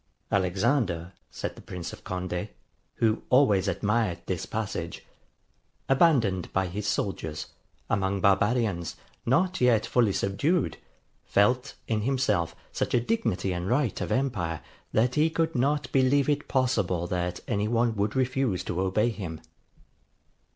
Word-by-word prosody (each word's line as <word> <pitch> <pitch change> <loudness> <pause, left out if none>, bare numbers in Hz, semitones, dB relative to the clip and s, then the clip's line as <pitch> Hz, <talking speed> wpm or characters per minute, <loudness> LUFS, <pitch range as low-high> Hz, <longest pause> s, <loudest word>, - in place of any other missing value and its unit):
'Alexander,' 95 - +1 0.2
said - - -5
the - - -12
Prince 90 -2 -6
of - - -11
Conde, 90 +1 -3 0.5
who 110 -1 +1
always 105 -8 +4
admired 105 -1 +1
this - - -3
passage, - - -4 0.8
'abandoned 125 - +3
by 95 0 +1
his 100 +4 -4
soldiers, 80 -7 -2 0.4
among 95 0 0
barbarians, 100 -2 +2 0.3
not 180 +8 +2
yet 120 -3 +4
fully 120 -5 +3
subdued, 135 - 0 0.5
felt 125 +6 +2
in 110 -2 0
himself 125 -9 +1 0.2
such - - -1
a - - +5
dignity 105 - 0
and 90 +1 -3
right 125 -1 +1
of - - -3
empire, 100 - -1 0.3
that 120 +3 +2
he 155 +4 +3
could 165 0 0
not 140 +2 0
believe 135 +1 +3
it 145 0 0
possible 100 -10 +1
that 90 0 -2
any 105 +1 0
one 115 0 +1
would 105 0 -1
refuse 130 -6 0
to 90 - -2
obey 100 +5 +2
him. 90 -8 -5
105 Hz, 135 wpm, -27 LUFS, 95-130 Hz, 0.8 s, a